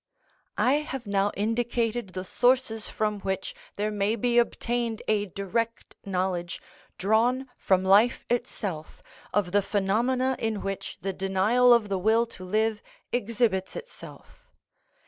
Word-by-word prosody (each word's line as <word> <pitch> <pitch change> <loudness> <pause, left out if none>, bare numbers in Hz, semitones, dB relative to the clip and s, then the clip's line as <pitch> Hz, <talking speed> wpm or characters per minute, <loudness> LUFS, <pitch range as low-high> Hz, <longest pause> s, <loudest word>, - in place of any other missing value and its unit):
I 270 +3 +3
have 270 -4 -5
now 200 0 +1
indicated 230 -1 -1
the 185 0 -4
sources 245 +1 +1
from 210 -1 -1
which 195 - -3 0.2
there 210 +1 -1
may 205 +1 0
be 240 +1 +2
obtained 235 -1 -1
a 210 -1 +1
direct 220 +5 -3
knowledge, 180 -2 -2 0.4
drawn 235 +6 +2
from 190 -1 +2
life 205 +5 +4
itself, 205 -9 -4 0.3
of 200 -4 0
the 205 +1 +4
phenomena 240 +7 +1
in 220 -2 -2
which 195 0 -5
the 195 0 -2
denial 195 +7 +3
of 235 -3 +5
the 195 -2 -1
will 220 +4 +3
to 190 -5 -11
live 215 +3 0 0.3
exhibits 220 -5 0
itself. - - -12
215 Hz, 130 wpm, -27 LUFS, 195-240 Hz, 0.4 s, of